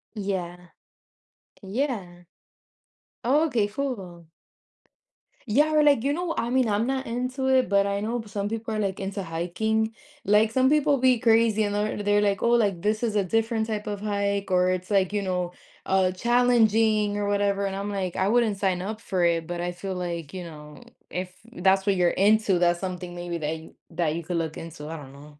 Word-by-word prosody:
Yeah. 180 -4 -4 0.9
Yeah. 195 -5 -3 1.0
Oh 290 +6 +3
okay, 225 -8 +1
full. 195 - -5 1.2
Yeah. 295 +8 +3
We're 305 0 +5
like, 285 -5 +4
you 285 +1 +1
know 345 0 -2
I 235 - -1
mean, 255 -2 +2
I'm 210 +3 +1
not 265 0 -1
into 255 +3 -2
it, 260 -5 +3
but 200 0 +3
I 200 0 -1
know 230 +3 -2
but 220 -2 -10
some 205 0 -2
people 225 0 -4
are, 215 - -1
like, 195 -2 -2
into 195 +1 -4
hiking. 220 +7 -1 0.3
Like, 210 +2 +4
some 260 +2 +3
people 295 -1 +3
be 255 -2 +3
crazy 225 -2 +3
and 205 0 -1
they're 210 0 -1
they're 205 0 +2
like, 200 -2 +1
"Oh, 235 - +3
like, 205 -7 +2
this 215 +3 0
is 225 -3 0
a 205 - +3
different 225 +3 0
type 215 -1 -4
of 205 -1 -3
hike, 200 -1 -1
or 180 0 +3
it's," 185 0 -3
like, 195 -2 +2
you 205 - 0
know, 180 -2 -2 0.3
uh, 190 -1 +2
"challenging," 220 -1 +3
or 205 0 -1
whatever. 200 0 +1
And 195 -1 -3
I'm 200 +1 -4
like, 185 -3 -3
"I 190 - +1
wouldn't 225 -2 +2
sign 190 -2 0
up 215 +3 -5
for 185 -5 -1
it." 165 -1 +1
But 175 0 -4
I 175 0 -2
feel 190 +2 -5
like, 170 -3 -4
you 185 - -5
know, 150 -1 -11 0.3
if 180 0 -5 0.2
that's 190 -2 +2
what 200 -2 +2
you're 180 -1 +3
into, 205 -1 +3
that's 175 0 +2
something 180 -1 -5
maybe 175 -1 -4
that 155 +1 -2
you 160 - -14 0.2
that 165 -2 -1
you 170 - -4
could 175 +1 -3
look 160 -1 -3
into. 160 -2 -8
I 160 +1 -5
don't 135 -2 -11
know. 145 +1 -15
200 Hz, 205 wpm, -25 LUFS, 180-225 Hz, 1.2 s, We're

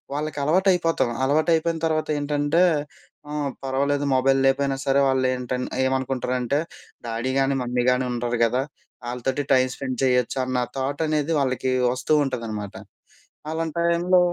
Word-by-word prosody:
వాళ్ళకి 150 -1 -3
అలవాటు 185 +5 +3
అయిపోతాం. 165 -8 0
అలవాటు 155 +4 +2
అయిపోయిన 165 0 -1
తర్వాత 155 -1 -1
ఏంటంటే 145 +4 +1 0.7
ఆహ్, 145 -2 -2
పర్వాలేదు. 140 +2 0
మొబైల్ 135 +1 +3
లేకపోయినా 135 0 +2
సరే 135 0 +3
వాళ్ళేంటన్ 130 -1 0 0.2
ఏమనుకుంటారంటే, 130 0 -1 0.5
డాడీ 115 +3 -2
గానీ, 135 0 +2
మమ్మీ 125 0 -1
గాని 125 0 +1
ఉండారు 120 0 -2
గదా! 125 +3 0 0.5
ఆళ్ళతోటి 125 +3 -2
టైం 130 0 +4
స్పెండ్ 130 -2 -4
చేయొచ్చు 125 0 +1
అన్న 130 0 -2 0.2
థాట్ 140 +3 -2
అనేది 155 +1 0
వాళ్ళకి 130 -1 0 0.2
వస్తూ 130 +4 -1
ఉంటాదనమాట. 110 -6 -5 0.8
అలాంటి 160 0 -3
టైంలో 175 +2 +3
135 Hz, 135 wpm, -23 LUFS, 125-150 Hz, 0.8 s, టైం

